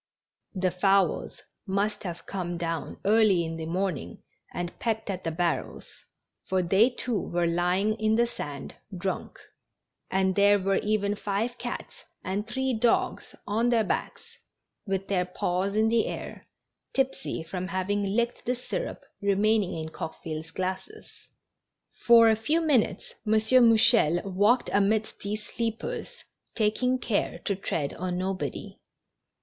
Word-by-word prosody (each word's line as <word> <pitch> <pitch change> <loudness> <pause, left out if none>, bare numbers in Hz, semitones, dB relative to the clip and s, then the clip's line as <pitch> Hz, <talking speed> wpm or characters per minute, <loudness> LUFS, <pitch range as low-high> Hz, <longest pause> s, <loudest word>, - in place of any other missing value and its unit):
The 185 -1 +1
fowls 195 +2 +1 0.2
must 200 +2 0
have 175 -2 -6
come 175 -3 -4
down 165 -1 -3
early 205 -4 +4
in 165 0 -5
the 160 -1 -5
morning 170 - -3 0.3
and 175 0 -5
pecked 220 -3 -1
at 185 -1 -5
the 165 - -1
barrels, 170 0 -2 0.6
for 185 -1 +1
they, 195 +7 +4
too, 245 -4 -2
were 175 0 -1
lying 180 +5 +1
in 220 0 +2
the 235 +1 +4
sand, 145 - -6 0.2
drunk; 190 +1 -4 0.7
and 190 0 +2
there 205 +1 +5
were 195 0 +1
even 205 -1 +1
five 215 +5 -2
cats 245 - -5 0.3
and 200 +3 -2
three 265 +1 -1
dogs 230 +1 +1
on 225 +4 +1
their 235 -2 +3
backs, - - -4 0.5
with 195 0 -2
their 185 -3 +1
paws 180 +2 -1
in 220 +1 +3
the 225 0 +2
air - - -7 0.2
— - - -54
tipsy 265 -10 -1
from 180 +2 -4
having 195 +2 -1
licked 235 +5 -1
the 250 - +1
syrup - - -5 0.2
remaining 200 -1 +2
in 160 0 -4
Coqueville's 160 0 -6
glasses. 190 - -5 1.0
For 230 -1 +8
a 220 - +5
few 295 +10 +1
minutes 295 -9 +1
M. 215 - +3
Mouchel 220 -6 +5
walked 205 +6 +3
amidst 210 +2 +1
these 210 +1 -4
sleepers, 230 - -4 0.3
taking 250 +4 +1
care 230 -4 -1
to 200 - +1
tread 160 -6 -2
on 180 0 -3
nobody. 185 +1 -4
200 Hz, 140 wpm, -27 LUFS, 180-225 Hz, 1.0 s, For